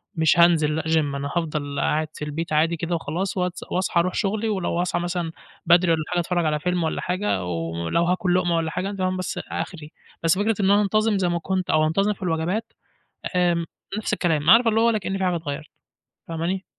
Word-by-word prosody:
مش 160 +1 +3
هانزِل 160 -3 +4
لأ 160 - 0
GYM، 160 0 +3 0.2
أنا 140 0 -3
هافضل 150 -4 -2
قاعد 155 0 +1
في 150 - -6
البيت 155 +2 -4
عادي 165 +2 +2
كده 170 +2 -2
وخلاص، 175 +5 -3
واتس 180 0 -2
وأصحى 180 -1 +1
أروح 185 +2 +1
شغلي، 215 +2 -1
ولو 185 -4 -1
هاصاحي 175 0 0
مثلًا 175 -2 -2 0.3
بدري 175 +1 +5
والّا 160 -1 +1
حاجة 175 - +1
أتفرّج 175 -1 0
على 150 -1 +1
فيلم 180 +2 0
والّا 160 - -1
حاجة، 180 - -1
ولو 85 - -1
هاكل 180 0 +1
لُقمة 175 -2 +2
والّا 160 -1 -1
حاجة 185 +3 -2
تمام 185 -2 -1
بس 185 - -4
آخري. 155 -4 -5 0.3
بس 165 +3 +3
فكرة 215 +1 +1
إن 195 0 +3
أنا 205 +1 +5
أنتظم 215 +1 +2
زي 185 -2 +1
ما 175 0 0
كنت 185 +1 -2
أو 155 0 +3
أنتظم 195 +6 +1
في 195 - -21
الوجبات، 175 +6 -1 0.6
آمم، 175 -2 +2 0.3
نفس 215 - -3
الكلام، 165 -5 +2
عارِفة 230 +1 +7
اللي 220 +1 +2
هو 230 - +4
ولا 225 -2 +3
كأن 195 0 -3
في 190 - -1
حاجة 180 -1 +1
اتغيّرت، 150 -1 -5 0.6
فاهماني؟ 170 +4 -3
175 Hz, 210 wpm, -23 LUFS, 160-190 Hz, 0.6 s, عارِفة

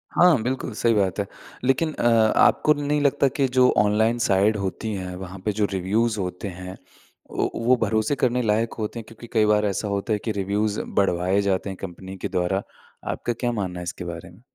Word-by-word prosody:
हाँ, 170 -9 +5
बिल्कुल 130 -1 -2
सही 115 +2 +2
बात 100 -2 +1
है। 100 - 0 0.4
लेकिन 135 +5 +2
अ, - - -4 0.3
आपको 150 - +5
नहीं 145 0 -1
लगता 140 -1 +3
कि 135 +1 0
जो 125 0 +6
ऑनलाइन 110 +3 +3
साइड 100 +2 +3
होती 100 +3 -3
हैं, 90 -2 -5
वहाँ 95 0 -8
पे 105 - +2
जो 105 0 0
रिव्यूज़ 105 +4 0
होते 90 +2 -4
हैं, 90 +1 -8 0.5
वो - - 0
वो 120 +2 +3
भरोसे 110 +5 +1
करने 125 0 +1
लायक 110 +1 +1
होते 110 +2 -3
हैं, - - -7
क्योंकि 115 +1 -12
कई 110 -2 +4
बार 105 0 +3
ऐसा 100 +1 -1
होता 100 +2 -1
है 105 - 0
कि 110 - 0
रिव्यूज़ 100 +1 -1 0.2
बढ़वाए 95 +1 +2
जाते 100 0 0
हैं, 95 - -6
कंपनी 95 +1 -8
के - - -3
द्वारा। 95 +2 0 0.5
आपका 120 - -2
क्या 120 +1 -2
मानना 95 -5 -3
है, - - -5
इसके 90 0 -6
बारे 85 +1 -7
में? 90 +6 -18
105 Hz, 205 wpm, -24 LUFS, 95-115 Hz, 0.5 s, जो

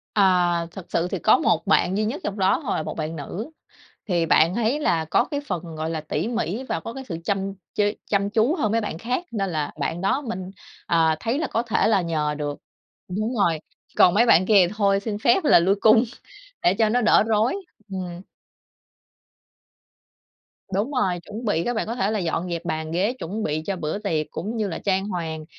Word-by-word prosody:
À. 180 -4 +3
Thật 190 -2 -9
sự 170 +1 0
thì - - -3
có - - +5
một - - +1
bạn 190 +2 +3
duy 215 - +1
nhất 240 +8 -3
trong 205 - -3
đó 190 0 +3
thôi 235 - -1
là - - -2
một - - -6
bạn 155 +1 -3
nữ. 180 - -6 0.6
Thì 175 -4 +1
bạn 165 +2 +4
ấy 235 +5 +1
là 165 - +1
có 160 - +2
cái 285 -1 -1
phần, 170 -3 -4
gọi 155 +1 -3
là, 160 -1 -3
tỉ 155 - -2
mỉ 230 -1 -2
và - - -2
có 230 - -7
cái 270 - -7
sự 165 - -3
chăm 195 +1 -1 0.2
chế 205 0 +1
chăm 200 -1 0
chú 225 +9 +2
hơn 220 - 0
mấy 230 +1 +2
bạn 205 -6 -4
khác. 250 - -2
Nên 195 -4 -1
là 155 -4 -2
bạn 165 +4 -2
đó 195 +9 +1
mình, 190 -8 -5 0.3
à, 160 -2 +3
thấy 235 - -1
là 320 - -1
có 230 - -1
thể 230 -3 +1
là 210 -3 +3
nhờ 155 -3 -1
được, 145 -1 -4 0.5
đúng 215 +6 -2
rồi. 170 -6 +2 0.4
Còn 180 - +6
mấy 225 +5 +4
bạn 185 -6 +5
kia 195 -3 +5
thì 180 - -7
thôi 200 -2 +3
xin 205 0 -4
phép 235 - +3
là 290 - +6
lui 190 +4 +3
cung 220 +1 +6 0.6
để 175 - +5
cho 220 +2 +2
nó 245 +3 +2
đỡ 215 - +5
rối. 220 - +2 0.4
Ừm. 180 -2 -5 2.5
Đúng 205 +8 0
rồi. 190 -10 0
Chuẩn 220 +6 -7
bị 205 -7 +1
là - - 0
các 245 - 0
bạn 220 - -1
có 230 - -3
thể 205 -3 0
là 215 - 0
dọn 175 0 -2
dẹp 170 0 -4
bàn 160 -1 -3
ghế 190 +8 +1
chuẩn 205 +6 -4
bị 155 -2 -1
cho 200 - -2
bữa 155 0 -3
tiệc 165 -7 -1
cũng 215 +8 -4
như 215 -2 0
là 170 - -4
trang 190 0 0
hoàng 160 -5 -4
195 Hz, 225 wpm, -24 LUFS, 170-220 Hz, 2.5 s, Còn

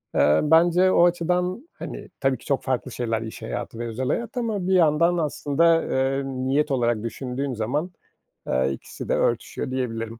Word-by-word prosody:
Eee, 75 +1 +4
bence 175 +4 +4
o 175 - +5
açıdan, 180 - 0
hani, - - -8
tabii 135 -2 +1
ki, - - -18
çok 140 -2 0
farklı 130 0 -2
şeyler 115 -2 -2
iş 110 -1 -7
hayatı 115 - -5
ve 120 - -3
özel 125 +3 -3
hayat 235 - -2
ama 215 -6 -1
bir 190 - +2
yandan 170 0 +4
aslında, 165 +1 +2
eee, 135 +1 0
niyet 135 +3 0
olarak 120 -4 +1
düşündüğün 130 +3 -4
zaman, 135 +10 -2 0.6
eee, 65 +1 +1
ikisi - - -9
de - - +2
örtüşüyor 130 - -1
diyebilirim. 115 -3 -3
135 Hz, 170 wpm, -24 LUFS, 120-170 Hz, 0.6 s, o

